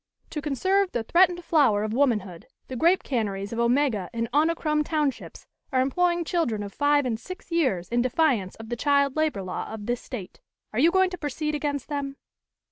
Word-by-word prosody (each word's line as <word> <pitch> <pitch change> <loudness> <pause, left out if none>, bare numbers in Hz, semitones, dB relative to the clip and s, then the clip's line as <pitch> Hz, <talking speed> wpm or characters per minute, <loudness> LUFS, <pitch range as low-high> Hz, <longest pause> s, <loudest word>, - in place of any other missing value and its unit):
"To 300 - -3
conserve 375 +7 +1
the 235 - -1
threatened 350 +6 +3
flower 270 -12 +3
of 215 0 -2
womanhood, 210 -10 0 0.2
the 260 - -5
grape 340 +8 +3
canneries 205 -5 -2
of 230 - -3
Omega 235 -5 +1
and 230 -1 -2
Onicrom 305 0 +2
Townships 300 -3 -2 0.3
are 260 - +2
employing 345 +6 +1
children 255 - -1
of 200 - -8
five 290 -1 +2
and 225 -3 -1
six 365 +6 -10
years 260 - +1
in 240 +4 +1
defiance 255 - +1
of 225 0 -11
the 240 - -2
Child 280 +1 +2
Labor 310 -11 0
Law 185 +3 -5
of 215 -2 -7
this 240 +1 -2
State. 215 -9 -8 0.3
Are 220 - -1
you 320 +6 +6
going 375 +1 +3
to 360 - -6
proceed 300 +1 -3
against 290 -2 -2
them?" 280 -2 -3
275 Hz, 190 wpm, -26 LUFS, 225-315 Hz, 0.3 s, you